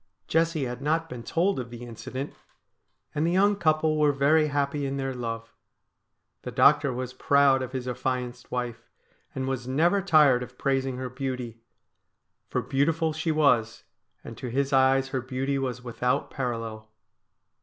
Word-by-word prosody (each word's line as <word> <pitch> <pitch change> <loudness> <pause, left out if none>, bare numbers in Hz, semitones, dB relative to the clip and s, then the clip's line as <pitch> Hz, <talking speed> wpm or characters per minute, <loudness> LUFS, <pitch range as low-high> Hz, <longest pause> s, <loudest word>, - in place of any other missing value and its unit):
Jessie 165 -2 +1
had 125 +1 -5
not 160 +3 0
been 125 -4 -7
told 170 +8 0
of 125 -2 -5
the 120 0 -9
incident, 130 +4 -6 0.8
and 150 0 0
the 170 - +2
young 200 +3 +4
couple 155 -4 +2
were 150 -1 +4
very 150 +3 +3
happy 140 0 -1
in 135 +1 -3
their 135 -1 -2
love. 115 -2 -5 0.9
The - - -6
doctor 140 - +4
was 125 0 -4
proud 140 0 +4
of 130 - -4
his 130 -1 -4
affianced 125 0 -3
wife, 120 -2 -4 0.5
and 130 0 -2
was 130 -2 -3
never 170 +9 +2
tired 150 -9 +5
of 125 0 -9
praising 135 -1 0
her 130 0 -4
beauty. 125 -4 -5 0.9
For - - -2
beautiful 160 +3 +1
she 160 +1 -1
was, 125 -8 +2 0.4
and - - -8
to 130 - -5
his 140 +3 -1
eyes 135 0 +4
her 135 -2 -2
beauty 135 +2 -2
was 125 -2 -3
without 125 +3 -1
parallel. 115 -4 -4
135 Hz, 160 wpm, -27 LUFS, 125-150 Hz, 0.9 s, tired